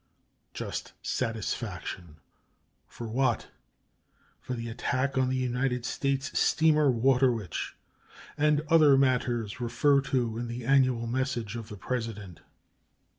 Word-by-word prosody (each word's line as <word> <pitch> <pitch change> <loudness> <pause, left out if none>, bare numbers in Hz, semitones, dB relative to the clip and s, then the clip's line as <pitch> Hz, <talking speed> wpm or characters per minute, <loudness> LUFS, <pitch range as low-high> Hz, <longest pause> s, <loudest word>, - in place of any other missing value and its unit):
"Just - - -5
satisfaction" 110 -7 -3 0.7
for 120 - -8
what? 130 +4 0 0.9
For 130 - -5
"the 115 0 -5
attack 130 +4 -1
on 130 -1 +2
the 130 - 0
United 125 -1 -1
States 140 +1 -2
steamer 155 -2 +4
Water 130 +1 +4
Witch" 105 -8 -4 0.6
and 150 0 +3
"other 150 -4 +6
matters 125 -5 +1
referred 140 +3 +2
to 120 -4 -1
in 120 - -3
the 120 0 -6
annual 130 -3 +3
message 120 -3 -2
of 115 -1 -7
the 105 - -8
President." 105 -5 -5
125 Hz, 120 wpm, -28 LUFS, 115-135 Hz, 0.9 s, other